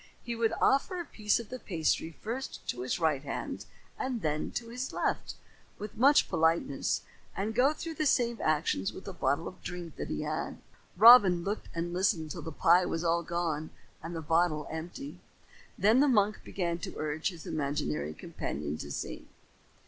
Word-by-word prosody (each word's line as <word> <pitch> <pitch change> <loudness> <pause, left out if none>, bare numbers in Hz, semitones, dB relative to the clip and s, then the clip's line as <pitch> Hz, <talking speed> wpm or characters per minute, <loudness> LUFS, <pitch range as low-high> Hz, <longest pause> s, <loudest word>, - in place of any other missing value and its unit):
He 240 -1 -3
would 230 -1 +1
offer 275 +7 +2
a 345 - -4
piece 210 -6 +1
of 230 - -8
the 255 - -6
pasty 160 -4 0
first 245 +5 -5
to 120 - -2
his 130 - -1
right 155 -5 +2
hand 140 - -5 0.3
and 250 -5 -2
then 150 -1 -1
to 230 -1 -4
his 250 +3 -4
left, - - -1 0.4
with 210 0 -7
much 275 +6 +5
politeness, 160 -4 +1 0.3
and 205 +3 -1
go 255 +5 +4
through 325 +1 -5
the 310 -1 0
same 235 -3 +2
actions 150 -11 +1
with 190 - -11
a 195 - -5
bottle 145 0 0
of 185 - -10
drink 175 -2 -7
that - - -4
he 75 - -2
had. - - -3 0.4
Robin 200 -5 +9
looked 205 +3 -3
and 170 +1 -2
listened 175 -4 +1
till - - -5
the 160 - -6
pie 175 +3 +5
was 165 - -2
all 170 0 +2
gone 165 -2 -2 0.3
and 170 +1 -6
the 165 - -4
bottle 160 -1 +2
empty. 175 - -6 0.6
Then 220 +5 +5
the 290 - +5
monk 210 -5 +3
began 170 -3 -2
to - - -6
urge 155 +2 -1
his 170 -4 -10
imaginary 140 - -2
companion 75 +1 -4
to 70 - -6
sing. - - -5
175 Hz, 180 wpm, -30 LUFS, 155-230 Hz, 0.6 s, Robin